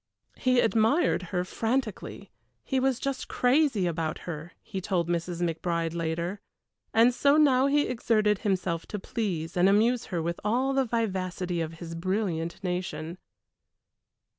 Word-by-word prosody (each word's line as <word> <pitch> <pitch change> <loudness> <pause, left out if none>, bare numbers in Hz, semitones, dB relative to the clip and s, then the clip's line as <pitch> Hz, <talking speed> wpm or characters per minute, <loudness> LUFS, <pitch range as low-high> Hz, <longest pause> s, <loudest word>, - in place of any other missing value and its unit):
He 255 -1 +3
admired 225 - +2
her 180 -1 0
frantically, 225 +4 -3 0.3
he 265 - 0
was 260 -1 +1
just 275 -1 -3
"crazy" 250 - +2
about 165 -1 -2
her, 165 0 -6
he 195 -4 -5
told 180 -3 0
Mrs. 175 0 -1
McBride 165 0 -2
later. 170 +3 -2 0.5
And 235 +2 +5
so 280 +4 +4
now 275 -3 +5
he 290 +1 +3
exerted 215 -4 +1
himself 185 -4 -1
to 210 - -4
please 185 -6 -3
and 180 +2 +4
amuse 230 +4 +3
her 175 - -3
with 170 +1 -2
all 250 +6 +1
the 270 -1 +2
vivacity 185 -6 -2
of 165 0 -3
his 165 0 -8
brilliant 175 0 -2
nation. 180 -2 -3
190 Hz, 140 wpm, -28 LUFS, 170-240 Hz, 0.5 s, And